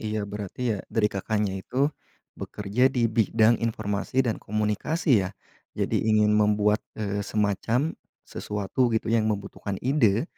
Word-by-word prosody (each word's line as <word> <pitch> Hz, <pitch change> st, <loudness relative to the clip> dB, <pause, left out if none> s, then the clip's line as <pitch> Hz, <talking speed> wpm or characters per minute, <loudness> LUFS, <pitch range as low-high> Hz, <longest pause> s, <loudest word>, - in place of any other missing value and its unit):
iya 105 Hz, -1 st, -2 dB
berarti 100 Hz, +3 st, -6 dB
ya, 100 Hz, -, -3 dB
dari 105 Hz, -2 st, +1 dB
Kakaknya 105 Hz, 0 st, -1 dB
itu 140 Hz, +8 st, 0 dB, 0.4 s
bekerja 105 Hz, +6 st, 0 dB
di 125 Hz, -3 st, 0 dB
bidang 110 Hz, 0 st, +3 dB
informasi 110 Hz, +3 st, -1 dB
dan 115 Hz, -, -1 dB
komunikasi 110 Hz, -, +1 dB
ya. -, -, -11 dB, 0.5 s
Jadi 110 Hz, -, 0 dB
ingin 105 Hz, -1 st, +4 dB
membuat, 105 Hz, 0 st, +3 dB, 0.2 s
eee, 100 Hz, -1 st, -2 dB
semacam 110 Hz, -, 0 dB, 0.3 s
sesuatu 105 Hz, +5 st, -1 dB
gitu 110 Hz, 0 st, -1 dB
yang 110 Hz, -1 st, +2 dB
membutuhkan 100 Hz, -1 st, -4 dB
ide, 125 Hz, -4 st, +3 dB
110 Hz, 135 wpm, -26 LUFS, 105-115 Hz, 0.5 s, ingin